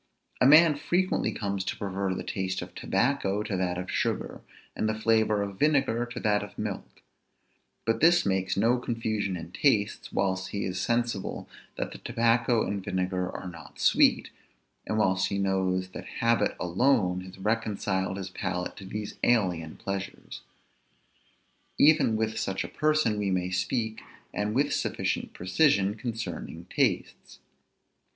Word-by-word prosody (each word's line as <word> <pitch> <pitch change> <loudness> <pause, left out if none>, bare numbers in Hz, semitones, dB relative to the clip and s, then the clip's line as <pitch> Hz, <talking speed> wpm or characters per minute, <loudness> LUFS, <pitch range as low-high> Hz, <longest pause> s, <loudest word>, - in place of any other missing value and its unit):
A 125 - +7
man 155 +2 +8
frequently 175 +5 0
comes 100 -2 -2
to - - -3
prefer 100 -1 -2
the - - -4
taste 95 -2 -2
of 90 0 -11
tobacco 105 -1 0
to 105 -2 -3
that 90 -1 -1
of 90 +1 -5
sugar, - - -2 0.3
and 110 - 0
the 110 0 -2
flavor 110 -2 +2
of 100 -1 -7
vinegar 135 -6 +2
to 120 +1 -6
that 105 -1 +2
of 105 -3 -9
milk; - - -6 0.8
but 115 0 0
this 175 +2 +5
makes 95 -1 0
no 115 +5 +3
confusion 110 -5 -2
in 85 0 -9
tastes, 105 -2 +1
whilst 95 -1 0
he 100 - -3
is 90 -1 -3
sensible 120 -4 -1 0.3
that - - -3
the - - -9
tobacco 115 0 +2
and 100 0 -3
vinegar 90 0 -1
are 95 - -7
not 80 -5 -11
sweet, - - +4 0.6
and 110 - -1
whilst 95 -3 +2
he 100 - -2
knows 95 -1 0
that - - -8
habit 115 -1 +2
alone 90 0 +2
has 95 0 -11
reconciled 100 -2 -1
his 95 -1 -6
palate 90 -1 -3
to 95 - -9
these 105 +2 -6
alien 90 -9 +1
pleasures. 100 0 -6 1.4
Even 150 -6 +5
with 110 0 -1
such 95 0 -2
a - - -5
person 155 -8 +1
we 100 -1 0
may 90 -1 0
speak, 110 +5 -1 0.3
and 105 +1 -1
with 145 +2 +2
sufficient - - -1
precision, 100 - +2
concerning 115 0 -5
tastes. - - -1
100 Hz, 150 wpm, -28 LUFS, 95-115 Hz, 1.4 s, man